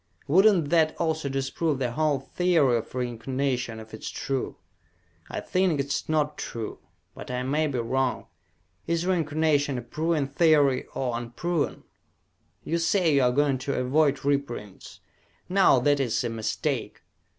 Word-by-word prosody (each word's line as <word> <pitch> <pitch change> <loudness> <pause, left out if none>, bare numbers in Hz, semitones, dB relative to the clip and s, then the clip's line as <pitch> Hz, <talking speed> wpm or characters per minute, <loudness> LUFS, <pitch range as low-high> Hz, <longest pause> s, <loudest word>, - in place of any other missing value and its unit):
Would 185 +8 +5
not 180 -9 +4
that 160 -2 +3
also 160 -3 -1
disprove 135 +3 -1
the 125 -3 -1
whole 150 +1 +1
theory 160 -5 +2
of 115 +2 -7
reincarnation 125 -1 -2
if 110 0 -12
it 110 - -7
is - - -4
true? 135 -2 -3 0.7
I - - -4
think 185 -5 +1
it 140 - 0
is 145 +2 -3
not 150 -1 0
true, 115 -2 -5 0.3
but - - -10
I 125 0 -2
may 150 +4 +1
be 140 -3 -3
wrong. 125 +2 -1 0.6
Is 170 +1 0
reincarnation 155 -5 +1
a 120 - -5
proven 155 +4 -1
theory, 140 -2 +3
or 125 -3 -1
unproven? 140 +8 -2 0.8
You 170 - -1
say 165 -1 +2
you 140 - +4
are 125 -1 +3
going 140 0 +2
to 140 +2 -2
avoid 140 +2 +1
reprints. 140 -8 -3 0.5
Now 190 -7 +5
that 145 +2 +3
is 125 -4 0
a 120 - -1
mistake. 110 -1 -3
140 Hz, 155 wpm, -26 LUFS, 125-155 Hz, 0.8 s, Would